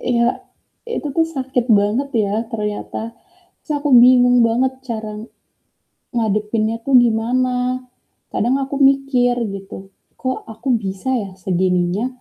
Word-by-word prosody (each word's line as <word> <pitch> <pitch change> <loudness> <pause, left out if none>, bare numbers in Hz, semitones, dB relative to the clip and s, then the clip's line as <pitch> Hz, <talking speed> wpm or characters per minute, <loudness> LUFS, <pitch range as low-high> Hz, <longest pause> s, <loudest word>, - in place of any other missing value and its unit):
ya, 235 -1 +1 0.6
itu 460 -10 -4
tuh 325 - +4
sakit 260 -2 -1 0.2
banget 220 +8 0 0.2
ya 200 +1 -2 0.2
ternyata. 220 +1 -4 0.5
Terus 305 - -8
aku 295 - +1
bingung 245 0 +6
banget 255 +3 +1
cara, 220 -2 -5 1.0
ngadepinnya 215 0 0
tuh 275 - +1
gimana. 250 +2 0 0.5
Kadang 245 +4 +1
aku 270 +1 -5
mikir 270 -3 +1 0.2
gitu, 195 0 -9 0.4
"Kok 260 0 -2
aku 225 +5 -7 0.2
bisa 195 +7 -3
ya 195 - -9
segininya 180 +3 0
240 Hz, 120 wpm, -19 LUFS, 215-255 Hz, 1.0 s, bingung